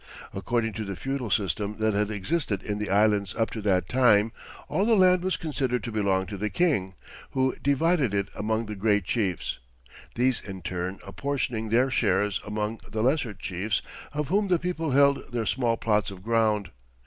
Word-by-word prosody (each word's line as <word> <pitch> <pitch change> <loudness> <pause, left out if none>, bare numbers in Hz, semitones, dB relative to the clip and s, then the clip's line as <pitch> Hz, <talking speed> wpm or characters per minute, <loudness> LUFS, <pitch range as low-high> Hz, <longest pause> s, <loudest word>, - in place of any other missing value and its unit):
According 110 +3 -1
to 110 +2 -4
the 100 -2 -5
feudal 135 +2 -3
system 100 +1 0
that 110 -1 +1
had 105 +1 +1
existed 105 - -1
in 105 0 -3
the 105 - -3
Islands 100 -1 +2
up 115 - 0
to 110 - -5
that 95 -4 +1
time, 115 -2 +4 0.4
all 150 +7 +1
the 225 +1 +4
land 185 -2 +5
was 185 +1 0
considered 130 -6 -1
to 115 - -4
belong 100 -3 +1
to 100 +2 -6
the 105 +2 -1
king, 105 - +1 0.4
who 130 -1 +1
divided 140 - +2
it 100 -1 0
among 110 +2 -1
the 105 -1 -6
great 105 0 +2
chiefs, 100 - -1 0.6
these 125 +1 +2
in 95 -3 -8
turn 90 +2 -3
apportioning 110 +2 -2
their 125 +4 +3
shares 100 -4 +1
among 105 +1 -3
the 110 0 -2
lesser 130 -5 +1
chiefs, 95 +3 -2 0.3
of 150 -1 -3
whom 200 +3 +2
the 180 -2 +3
people 165 -2 -2
held 140 0 +3
their 120 -2 -1
small 120 -1 +1
plots 105 -4 +1
of 95 -2 -10
ground. 110 -3 +1
110 Hz, 185 wpm, -27 LUFS, 100-130 Hz, 0.6 s, land